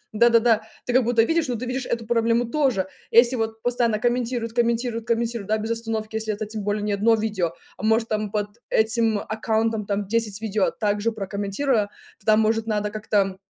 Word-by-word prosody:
да-да-да. 230 Hz, -1 st, +4 dB, 0.2 s
Ты 245 Hz, -, -2 dB
как 255 Hz, -1 st, +5 dB
будто 235 Hz, -2 st, +4 dB
видишь, 325 Hz, +1 st, +1 dB
но 245 Hz, -, -1 dB
ты 245 Hz, +3 st, -4 dB
видишь 255 Hz, +1 st, -3 dB
эту 230 Hz, -1 st, -2 dB
проблему 230 Hz, +1 st, +2 dB
тоже 245 Hz, -8 st, +1 dB, 0.2 s
если 235 Hz, +2 st, +5 dB
вот 225 Hz, -1 st, -3 dB
постоянно 240 Hz, -3 st, +1 dB
комментируют 240 Hz, 0 st, -1 dB
комментируют 235 Hz, -1 st, 0 dB
комментируют 230 Hz, -3 st, -1 dB
да 220 Hz, -, +2 dB
без 220 Hz, +2 st, -3 dB
остановки 225 Hz, -1 st, -3 dB
если 220 Hz, -1 st, -2 dB
это 210 Hz, +1 st, -3 dB
тем 215 Hz, -1 st, -6 dB
более 205 Hz, +1 st, -1 dB
не 210 Hz, -1 st, 0 dB
1 225 Hz, +3 st, +3 dB
видео, 205 Hz, -6 st, -1 dB, 0.2 s
а -, -, -10 dB
может 225 Hz, +1 st, +2 dB
там 215 Hz, -1 st, -1 dB
под 210 Hz, +1 st, -3 dB
этим 220 Hz, -1 st, +2 dB
аккаунтом 220 Hz, 0 st, -1 dB
там 200 Hz, 0 st, -1 dB
10 220 Hz, -2 st, -1 dB
видео 215 Hz, -2 st, 0 dB
также 210 Hz, +1 st, -1 dB
прокомментируя, 205 Hz, +3 st, -1 dB, 0.3 s
тогда 215 Hz, +1 st, +3 dB
может 220 Hz, +1 st, +1 dB
надо 210 Hz, -1 st, -1 dB
как-то, 205 Hz, -3 st, 0 dB
225 Hz, 185 wpm, -23 LUFS, 210-235 Hz, 0.3 s, как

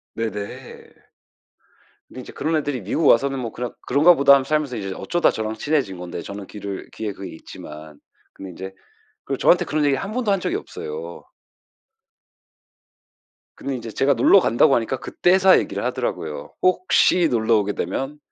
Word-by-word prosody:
네네. 105 Hz, -3 st, -6 dB, 1.2 s
근데 130 Hz, -, -9 dB
이제 -, -, -12 dB
그런 160 Hz, +3 st, -1 dB
애들이 145 Hz, -5 st, -2 dB
미국 110 Hz, -, -1 dB
와서는 135 Hz, +2 st, +3 dB
뭐 115 Hz, -3 st, -4 dB
그냥 125 Hz, -1 st, -5 dB, 0.2 s
'그런가 150 Hz, +7 st, +6 dB
보다.' 140 Hz, -1 st, +6 dB
하면서 135 Hz, -1 st, +2 dB
살면서 150 Hz, -5 st, 0 dB
이제 95 Hz, -2 st, -4 dB
어쩌다 175 Hz, 0 st, +1 dB
저랑 110 Hz, 0 st, -4 dB
친해진 130 Hz, -, -1 dB
건데 90 Hz, -1 st, -6 dB
저는 100 Hz, +1 st, -8 dB
귀를 100 Hz, -2 st, -7 dB
귀에 110 Hz, -2 st, -4 dB
그게 95 Hz, 0 st, -8 dB
있지만 75 Hz, -1 st, -11 dB, 0.3 s
근데 95 Hz, -1 st, -9 dB
이제 95 Hz, +2 st, -8 dB, 0.5 s
그 -, -, -3 dB
저한테 -, -, +4 dB
그런 150 Hz, 0 st, -1 dB
얘기를 140 Hz, -2 st, +1 dB
한 200 Hz, -, -5 dB
번도 240 Hz, -2 st, -1 dB
한 195 Hz, -1 st, +2 dB
적이 350 Hz, -, -1 dB
없어요. 450 Hz, +2 st, -7 dB, 2.3 s
근데 140 Hz, -, -4 dB
이제 115 Hz, -2 st, -7 dB
제가 135 Hz, +5 st, +2 dB
놀러 130 Hz, +10 st, +6 dB
간다고 120 Hz, -3 st, +3 dB
하니까 120 Hz, +3 st, -1 dB
그때서야 190 Hz, +1 st, +4 dB
얘기를 -, -, -4 dB
하더라고요. -, -, -4 dB
"혹시 185 Hz, -1 st, +3 dB
놀러오게 110 Hz, -3 st, +1 dB
되면 135 Hz, +7 st, -4 dB
130 Hz, 355 characters per minute, -22 LUFS, 105-160 Hz, 2.3 s, 그런가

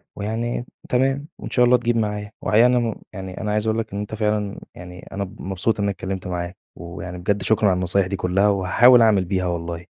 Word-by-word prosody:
ويعني 115 Hz, +4 st, -3 dB, 0.2 s
تمام 135 Hz, +3 st, +1 dB
وإن -, -, -7 dB
شاء 125 Hz, -, +4 dB
الله 125 Hz, +1 st, +5 dB
تجيب 120 Hz, -1 st, 0 dB
معايا. 105 Hz, -1 st, -2 dB
وحقيقي 110 Hz, +2 st, +3 dB
يعني 125 Hz, +1 st, +5 dB
أنا 120 Hz, -1 st, +1 dB
م 110 Hz, -, -4 dB, 0.2 s
يعني 95 Hz, -1 st, -7 dB
أنا 105 Hz, -, -2 dB
عايز 105 Hz, +1 st, 0 dB
أقول 110 Hz, +1 st, +1 dB
لك 110 Hz, -, -5 dB
إن 100 Hz, -, -3 dB
أنت 105 Hz, +1 st, -5 dB
فعلًا 105 Hz, -2 st, -1 dB, 0.2 s
يعني 90 Hz, +1 st, -11 dB
أنا 100 Hz, +1 st, -3 dB
ب 95 Hz, -, -10 dB
مبسوط 95 Hz, +4 st, -1 dB
إن -, -, 0 dB
أنا 100 Hz, -, +1 dB
اتكلمت 95 Hz, 0 st, -5 dB
معاك، 90 Hz, 0 st, -4 dB, 0.2 s
ويعني 85 Hz, +1 st, -8 dB
بجد 100 Hz, +2 st, -1 dB
شكرًا 110 Hz, 0 st, +3 dB
على 95 Hz, -, +2 dB
النصايح 90 Hz, +1 st, +1 dB
دي 95 Hz, -, -3 dB
كلّها، 95 Hz, +2 st, +1 dB
وهاحاول 105 Hz, +6 st, +5 dB
أعمل 105 Hz, -5 st, +4 dB
بيها 95 Hz, 0 st, -1 dB
والله. 85 Hz, -1 st, -4 dB
100 Hz, 230 wpm, -22 LUFS, 90-110 Hz, 0.2 s, الله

